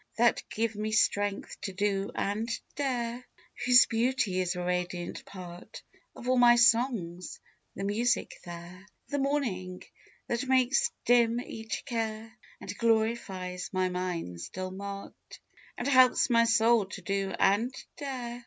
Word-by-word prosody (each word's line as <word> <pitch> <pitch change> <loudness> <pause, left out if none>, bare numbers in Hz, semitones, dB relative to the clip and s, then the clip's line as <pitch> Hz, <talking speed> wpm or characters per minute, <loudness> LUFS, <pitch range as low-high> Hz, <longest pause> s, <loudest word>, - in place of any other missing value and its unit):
That 235 +1 +3
give 225 0 -1
me 215 +1 -3
strength 205 -2 0
to 195 - -4
do 200 +1 0
and 215 +3 -1 0.3
dare; 245 -3 -2 0.4
Whose 250 0 +8
beauty 230 -5 0
is 180 0 0
a 180 - -3
radiant 180 0 -3
part 180 -2 -10 0.3
Of 245 - -9
all 255 0 +3
my 240 -1 +7
songs; 230 -7 +2 0.4
the 195 - -5
music 225 +4 0
there; 175 +2 -10 0.2
The 285 - -1
morning, 230 -11 -2 0.4
that 240 +3 -2
makes 260 0 +3 0.2
dim 235 -1 +4
each 225 -1 -6
care, 225 -2 -4 0.2
And - - -7
glorifies 220 -5 0
my 185 0 +1
mind's 175 - -4
dull 185 0 -5
mart, 200 +1 -8 0.4
And 245 - -3
helps 255 -1 +5
my 230 0 +5
soul 230 -1 +4
to 190 +1 -8
do 195 +1 -1
and 210 +6 +3 0.2
dare. 250 -4 -5
220 Hz, 135 wpm, -29 LUFS, 185-240 Hz, 0.4 s, Whose